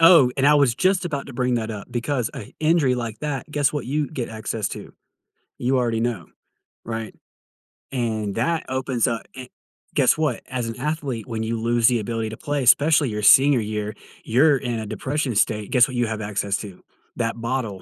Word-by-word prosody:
Oh, 165 -7 +7
and 135 - +1
I 150 - +6
was 140 -5 +4
just 185 +2 +2
about 145 -5 -3
to 140 - -9
bring 125 0 0
that 115 -1 -2
up, 105 -2 -7
because 125 0 -1
a 105 - -8
injury 155 -5 +3
like 115 -3 -5
that, 150 +1 -3
guess 145 -1 +1
what 145 - -3
you 145 +3 -1
get 130 -6 -4
access 110 -1 -3
to? - - -8 0.7
You 130 +2 +1
already 115 -2 0
know, 115 -8 -2 0.6
right? 110 -1 -5 0.8
And, 110 -5 -2
that 160 +8 0
opens 130 -3 0
up 115 -1 -1
eh 130 -1 -8 0.5
Guess - - +3
what? 150 -6 0
As 125 -3 -2
an 115 - -6
athlete, 140 -5 -3
when 115 -2 -4
you 115 +1 -2
lose 115 0 +2
the 120 -2 +3
ability 115 +1 -3
to 110 - -7
play, 145 +1 -2
especially 145 +3 +5
your 105 0 -3
senior 135 +4 +6
year, 105 0 -4 0.3
you're 140 +5 +4
in 120 -3 -3
a 110 - -5
depression 135 +3 -2
state. 105 0 +1
Guess 125 0 +5
what 130 - -7
you 120 -1 +1
have 110 -1 -3
access 100 -1 -2
to? 100 -4 -10 0.3
That 115 0 -2
bottle 115 -5 -3
120 Hz, 200 wpm, -23 LUFS, 110-140 Hz, 0.8 s, Oh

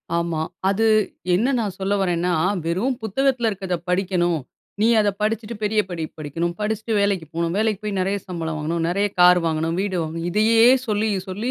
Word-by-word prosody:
ஆமா. 170 -2 -1 0.3
அது 220 +3 +1 0.5
என்ன 245 +9 +2
நான் 200 -5 -2
சொல்ல 195 +1 0
வர்றேன்னா, 175 -1 0 0.3
"வெறும் 205 +10 0
புத்தகத்ல 240 +1 +1
இருக்கறத 190 -3 -3
படிக்கணும். 180 -2 +1 0.4
நீ 225 - +4
அத 205 -1 +3
படிச்சிட்டு 220 +1 -1
பெரிய 210 +1 +1
படிப்பு 165 -3 -5
படிக்கணும். 165 +4 -3
படிச்சிட்டு 220 +1 -2
வேலைக்கு 200 -5 +1
போணும். 170 0 -1
வேலைக்கு 215 -2 +1
போய் 205 -2 -2
நெறைய 195 +2 0
சம்பளம் 165 -3 -4
வாங்கணும். 165 +2 -2
நெறைய 200 +4 +1
கார் 180 0 +7
வாங்கணும், 160 +1 -1
வீடு 195 -2 -2
வாங்கணும்." 165 +2 -4
இதையே 225 +3 +4 0.3
சொல்லி 215 +1 0 0.2
சொல்லி 210 +7 -3
190 Hz, 165 wpm, -22 LUFS, 170-215 Hz, 0.5 s, கார்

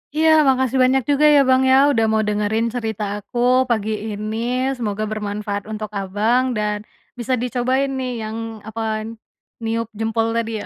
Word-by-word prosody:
Iya, 320 +1 +3 0.2
makasih 260 -1 +2
banyak 260 +1 +3
juga 285 +1 +3
ya, - - +7
Bang, 260 0 +5
ya. - - +7 0.2
Udah 225 -5 +2
mau 220 0 +2
dengerin 210 +2 0
cerita 220 -3 -3 0.2
aku 205 +4 -10 0.3
pagi 220 -2 0 0.2
ini. 215 +1 -4 0.4
Semoga 215 -3 -3
bermanfaat 205 -1 -3
untuk 215 -1 -5
Abang 210 +6 +1
dan 210 0 -1 0.4
bisa 240 +2 -1
dicobain 255 +2 0
nih 255 -1 -3
yang, 215 +1 -5 0.3
apa, 225 +1 -5 0.8
niup 225 0 -1
jempol 225 0 0
tadi, 230 -1 -1
ya. - - -8
225 Hz, 160 wpm, -20 LUFS, 210-250 Hz, 0.8 s, ya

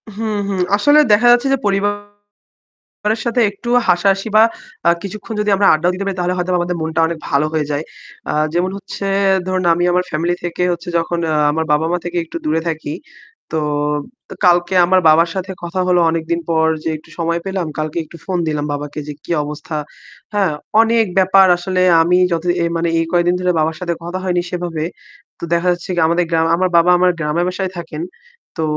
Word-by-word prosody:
হুম, 215 -1 -2
হুম। 190 -2 -2 0.2
আসলে 290 +7 +5
দেখা 220 +4 +5
যাচ্ছে 245 +3 +3
যে - - +2
পরিবারের 205 +1 -3 0.9
সাথে 235 +1 0
একটু 205 +4 -10 0.2
হাসা-হাসি 195 +4 +2
বা 220 - +8 0.5
আ - - +7
কিছুক্ষণ 210 +2 -7
যদি 210 - 0
আমরা 200 - +2
আড্ডাও 170 +3 +1
দিতে 200 +2 -4
পারি 195 -1 -2
তাহলে 180 +1 0
হয়তোবা 180 0 0
আমাদের 175 0 -2
মনটা 160 0 -1
অনেক 165 -1 -4
ভালো 145 +1 +2
হয়ে 155 -2 -1
যায়। 145 +2 -2 0.5
আ - - -1 0.2
যেমন 180 +2 +1
হচ্ছে 195 0 -6 0.4
ধরুন, 185 -1 -1
আমি 175 +1 0
আমার 180 0 +1
family 170 +3 0
থেকে 175 +1 -3
হচ্ছে 170 0 -6
যখন 170 +1 -2
আ - - +1 0.2
আমার 160 +2 -1
বাবা-মা 160 +4 +1
থেকে 175 0 -5
একটু 165 - -9
দূরে 155 +1 +1
থাকি। 155 -2 -4 0.6
তো, 160 - -1 0.7
তো - - -8
কালকে 175 +1 +3
আমার 185 +1 +4
বাবার 165 +2 +5
সাথে 190 0 -4
কথা 180 +2 -3
হলো 180 -1 +4
অনেকদিন 165 +1 -2
পর 160 -1 +2 0.2
যে - - -1
একটু - - -21
সময় 170 0 -1
পেলাম। 190 -3 -2
কালকে 155 +2 -2
একটু 170 - -14
phone 180 -2 -2
দিলাম 150 -1 -2
বাবাকে 145 +1 -5
যে 150 - -4
কি - - -12
অবস্থা। 150 +1 -6 0.6
হ্যাঁ, 195 -6 +2 0.3
অনেক 225 -1 +2
ব্যাপার 190 0 +5
আসলে 185 +1 -2 0.2
আমি 180 +2 +3
যত 165 +1 -1 0.2
এ - - +1
মানে 170 0 0
এই 165 - +1
কয়েকদিন 175 0 +2
ধরে 180 0 +1
বাবার 155 +1 0
সাথে 175 -1 -2
কথা 175 +2 -4
হয়নি 180 -1 0
সেভাবে। 175 -3 -3 0.5
তো - - -23
দেখা 175 +2 0
যাচ্ছে 175 +1 -6
কি 175 - 0
আমাদের 170 +1 +2
গ্রাম 165 0 +2
আমার 185 +1 +1
বাবা 170 +1 +5
আমার 180 0 +4
গ্রামের 160 +3 0
বাসায় 185 0 -3
থাকেন। 165 -2 -6 0.5
তো 160 - -2
175 Hz, 195 wpm, -17 LUFS, 165-190 Hz, 0.9 s, বা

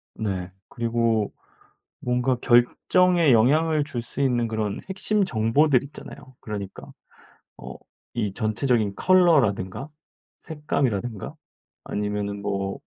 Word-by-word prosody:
네. 95 -4 -3 0.2
그리고 115 -2 0 0.7
뭔가 125 +1 0
결정에 165 +7 +3
영향을 150 +7 +3
줄 130 -5 -4
수 120 - -4
있는 120 -4 +1
그런 110 -2 -2
핵심 205 +2 +1
정보들 130 +1 +2
있잖아요. 140 -2 -12
그러니까 100 -3 -7 0.7
어 - - -9 0.4
이 105 -5 -2
전체적인 110 0 0
컬러라든가 135 - +3 0.5
색감이라든가 125 - -3 0.5
아니면은 105 0 -3
뭐 100 -1 -3
120 Hz, 245 characters per minute, -24 LUFS, 105-145 Hz, 0.7 s, 결정에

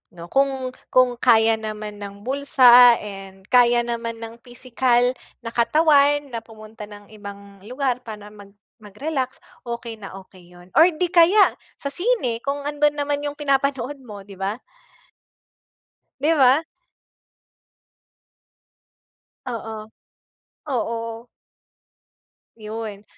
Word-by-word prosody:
no? 170 0 -11
Kung 270 -2 0 0.2
kung 250 -1 +2
kaya 225 -2 +4
naman 215 -1 -7
ng 200 0 -9
bulsa 250 -3 +6
and 195 -2 -10
kaya 240 -1 +5
naman 230 -1 -5
ng 225 +1 -9
pisikal 245 0 0 0.3
na 230 - -6
katawan 290 +3 +3
na 230 - -4
pumunta 215 -1 -12
ng 205 -1 -14
ibang 200 -1 -11
lugar 255 -1 -2
para 210 -2 -9
mag 200 -1 -15 0.3
mag-relax 260 +5 -5 0.3
okey 235 -1 -6
na 195 - -10
okey 185 -2 -19
yun. 175 +1 -17
Or 325 - +8
di 355 +1 -2
kaya 360 +4 +5 0.2
sa 280 - -5
sine 355 - -1
kung 280 +3 -3
andon 295 0 0
naman 290 0 -2
yung 290 - -5
pinapanood 275 -1 -1
mo 210 -6 -11
di 195 -1 -14
ba? 195 +2 -2 1.7
Di 315 +3 +2
ba? 270 +3 +5 2.9
Oo. 220 -2 -7 0.8
Oo. 230 -1 -4 1.3
'Yun. 215 -2 -7
235 Hz, 115 wpm, -22 LUFS, 215-275 Hz, 2.9 s, Or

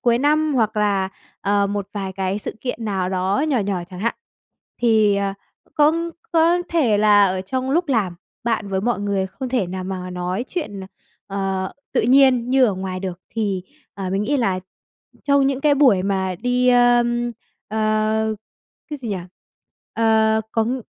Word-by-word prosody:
cuối 235 -1 +3
năm 300 +1 +2
hoặc 220 -3 +1
là, 200 -2 +1 0.3
ờ, 200 0 +2
một 200 -1 -3
vài 195 -2 -4
cái 190 +1 -2
sự - - -6
kiện 245 -3 -4
nào 190 -3 -1
đó 190 +7 0
nhỏ 270 - +2
nhỏ 195 -4 -1
chẳng 180 - -8
hạn. 230 +3 0 0.7
Thì, 215 -4 +4
ờ, 200 -1 -1 0.4
cũng 300 0 +4 0.2
c - - -21 0.2
có 335 +1 +4
thể 250 -12 +2
là 205 -1 +6
ở 185 0 -1
trong 260 +6 -3
lúc 340 +3 +1
làm 215 -9 +1 0.3
bạn 225 -3 -1
với 190 -1 -1
mọi 235 0 0
người 200 -2 0
không 255 +7 -6
thể 245 -7 0
nào 185 +1 -5
mà 185 -1 -5
nói 180 +5 -3
chuyện, 220 - -4
à, - - -7 0.4
ờ, 195 -1 -2 0.2
tự - - +3
nhiên 255 -1 +4
như 265 0 +5
ở 210 -6 +1
ngoài 185 0 -4
được, 185 -1 -5
thì, 200 -5 -2 0.3
ờ, 190 -2 -4
mình 195 +2 0
nghĩ 285 +7 0
là 195 -7 0 0.6
trong 280 -1 +3
những 275 0 0
cái 290 -1 +4
buổi 255 -10 +4
mà 190 -1 -1
đi, 250 +3 +1
ơm, 240 -1 +3 0.4
ờ, 215 0 +1 0.6
cái 295 - -4
gì 235 - -4
nhỉ? 200 - -1 0.8
Ờ, 220 -1 +3
công 235 +3 0
215 Hz, 180 wpm, -21 LUFS, 195-250 Hz, 0.8 s, là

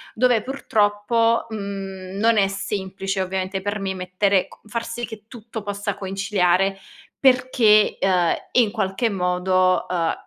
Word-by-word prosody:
dove 245 -1 +3
purtroppo, 230 -2 +1
mhmm, 195 -2 -6
non 225 +1 +3
è 195 -1 +4
semplice 195 0 -3
ovviamente 190 +1 -3
per 205 +1 -2
me 190 -1 -2
mettere 185 +1 0
co - - -17
far 230 +2 -3
sì 240 +1 -4
che 220 -2 -11
tutto 225 -2 -8
possa 205 0 -3
conciliare, 195 -1 0 0.4
perché, 255 -5 +4
ehm, 180 -3 +2 0.2
in 230 -5 +4
qualche 220 +1 -1
modo, 185 0 +1
ehm, 170 -2 0
200 Hz, 135 wpm, -22 LUFS, 190-220 Hz, 0.4 s, è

